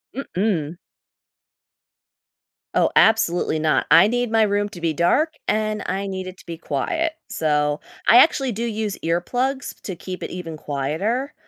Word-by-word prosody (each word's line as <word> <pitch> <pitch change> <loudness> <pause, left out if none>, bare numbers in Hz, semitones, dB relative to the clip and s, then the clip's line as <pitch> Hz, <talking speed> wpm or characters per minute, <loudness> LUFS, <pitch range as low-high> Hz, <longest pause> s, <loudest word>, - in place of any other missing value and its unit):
Mm-mm. 180 - -2 2.0
Oh, - - +3
absolutely 200 -8 +3
not. 155 0 +1
I - - +7
need 245 +1 0
my 225 -1 +4
room 205 0 0
to 175 - -11
be 165 -1 0
dark, 235 - +2
and 215 0 0
I 195 +1 -2
need 190 -1 -5
it 185 0 -9
to - - -17
be 170 - -6
quiet. 315 - -2
So, 150 -1 0 0.3
I 235 - +8
actually 270 -1 +4
do 225 +2 -4
use 220 -3 -3
earplugs 245 +12 -2
to 190 - -6
keep 185 +2 -7
it - - -4
even 170 -3 -6
quieter. 160 - -2
195 Hz, 150 wpm, -22 LUFS, 165-230 Hz, 2.0 s, I